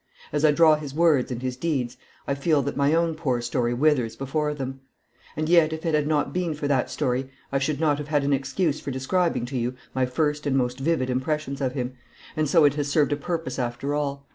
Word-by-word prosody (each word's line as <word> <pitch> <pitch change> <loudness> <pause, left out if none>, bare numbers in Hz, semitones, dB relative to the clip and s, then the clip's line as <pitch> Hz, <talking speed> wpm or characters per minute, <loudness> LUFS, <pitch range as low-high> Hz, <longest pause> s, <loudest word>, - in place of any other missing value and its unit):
As 150 0 0
I 155 - +6
draw 155 +1 +5
his 145 -2 -7
words 155 -6 +3
and 125 0 -4
his 130 -1 -2
deeds 130 -4 -2 0.3
I 140 - +1
feel 140 +1 +1
that - - -3
my 140 +2 +3
own 165 0 +2
poor 140 -6 -1
story 120 0 -1
withers 130 -4 +2
before 150 +3 -1
them. 135 -1 -5 0.6
And 155 0 -1
yet 165 -2 +5
if 160 +2 -6
it 165 - 0
had 150 -1 +2
not 150 -2 0
been 175 -3 -1
for 145 -1 -3
that 135 -3 +1
story 130 -2 -1 0.2
I 135 - +1
should 140 +1 -1
not 150 -3 +2
have 150 - -5
had 150 -2 +1
an 140 0 +2
excuse 140 +4 0
for - - -6
describing 135 +1 0
to 130 +1 -4
you 120 +2 -2 0.2
my 130 -1 +1
first 150 +3 -1
and 135 -1 +2
most 125 0 -1
vivid 135 -3 0
impressions 140 +2 -2
of 130 -2 0
him, 125 -1 -3 0.4
and 155 -2 0
so 160 -1 +5
it 145 - +4
has 145 -1 -2
served 145 0 +2
a - - +1
purpose 165 +1 -4
after 125 +3 -2
all. 140 -1 -2
145 Hz, 235 wpm, -25 LUFS, 130-155 Hz, 0.6 s, I